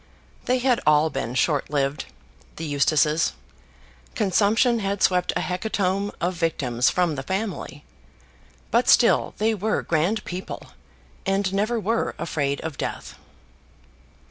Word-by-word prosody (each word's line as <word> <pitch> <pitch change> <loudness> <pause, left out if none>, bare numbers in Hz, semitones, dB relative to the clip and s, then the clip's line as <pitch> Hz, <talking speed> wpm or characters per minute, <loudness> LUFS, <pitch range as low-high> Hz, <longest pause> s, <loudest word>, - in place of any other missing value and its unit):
They 255 - +2
had 250 -1 +1
all 150 +1 +4
been 125 -2 -4
short 145 +1 +1
lived, 140 0 -1 0.5
the 165 - -5
Eustaces. 150 +2 +2 0.8
Consumption 220 +4 +2
had 200 -1 -2
swept 180 -1 +3
a - - 0
hecatomb 195 +1 -1
of 180 +2 0
victims 140 -8 0
from 180 -3 +1
the 140 - -4
family. 195 +8 -4 0.9
But 240 +2 +3
still 235 - +4
they 220 +1 +1
were 215 +1 -1
grand 175 +7 0
people, 185 +1 -7 0.5
and 195 -1 0
never 215 +4 0
were 225 +2 -1
afraid 140 -4 -2
of 160 -4 -6
death. - - -4
185 Hz, 125 wpm, -24 LUFS, 150-215 Hz, 0.9 s, all